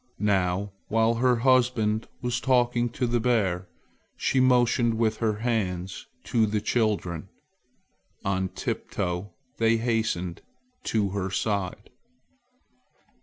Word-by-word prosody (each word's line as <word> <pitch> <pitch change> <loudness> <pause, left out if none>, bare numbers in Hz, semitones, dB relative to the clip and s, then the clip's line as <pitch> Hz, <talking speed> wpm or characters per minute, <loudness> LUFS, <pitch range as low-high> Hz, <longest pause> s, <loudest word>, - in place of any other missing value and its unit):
Now, 100 -1 +1 0.2
while 115 +1 +3
her 125 +2 +3
husband 120 -3 +2 0.2
was 125 0 0
talking 120 -2 +2
to 125 +2 -2
the 120 0 +1
bear, 100 -7 +1 0.5
she 130 - +1
motioned 120 -2 +3
with 110 -1 +1
her 110 -2 +1
hands 95 -5 -2 0.2
to 110 -2 +2
the 105 0 0
children. 105 -8 -1 1.0
On 95 -1 0
tiptoe 90 +2 -3 0.3
they 115 0 +4
hastened 110 -7 -1 0.4
to 105 -3 +1
her 95 -1 -2
side. 95 -1 -2
110 Hz, 110 wpm, -26 LUFS, 95-120 Hz, 1.0 s, they